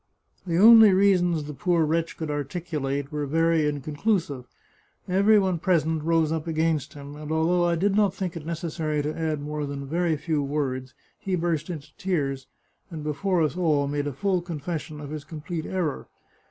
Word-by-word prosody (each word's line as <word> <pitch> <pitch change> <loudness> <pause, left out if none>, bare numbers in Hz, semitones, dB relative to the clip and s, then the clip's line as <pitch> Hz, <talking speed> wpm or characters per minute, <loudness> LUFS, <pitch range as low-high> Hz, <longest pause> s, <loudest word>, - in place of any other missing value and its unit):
The 170 -1 0
only 220 +1 +9
reasons 180 -4 +3
the 150 +1 -7
poor 170 0 +1
wretch 165 +2 -1
could 160 -2 -3
articulate 145 -2 -3
were 150 -1 -2
very 165 +1 +2
inconclusive. 150 - -1 0.6
Every 200 +4 +4
one 190 -4 +1
present 160 -3 +1
rose 165 -1 +2
up 160 0 -2
against 160 -3 0
him, 140 0 -9
and 150 +1 -7
although 170 +2 +2
I 170 0 +2
did 195 +4 +1
not 205 -2 +3
think 185 -2 -4
it 165 - -6
necessary 155 -2 -2
to 150 +1 -3
add 155 -3 -2
more 150 0 -4
than 140 0 -5
a - - -7
very 165 +2 0
few 150 0 -1
words, 135 -3 -3 0.2
he 190 -1 -1
burst 165 -2 -1
into 150 -4 -7
tears, 140 -8 -2 0.4
and 160 -4 -7
be 150 0 -1
fore 185 +1 +1
us 155 - -1
all 155 -6 +1
made 145 0 -2
a - - -2
full 185 +6 0
confession 160 -2 -5
of 145 -1 -8
his 155 -2 -5
complete 160 +1 -6
error. 175 -7 -2
160 Hz, 185 wpm, -25 LUFS, 145-175 Hz, 0.6 s, only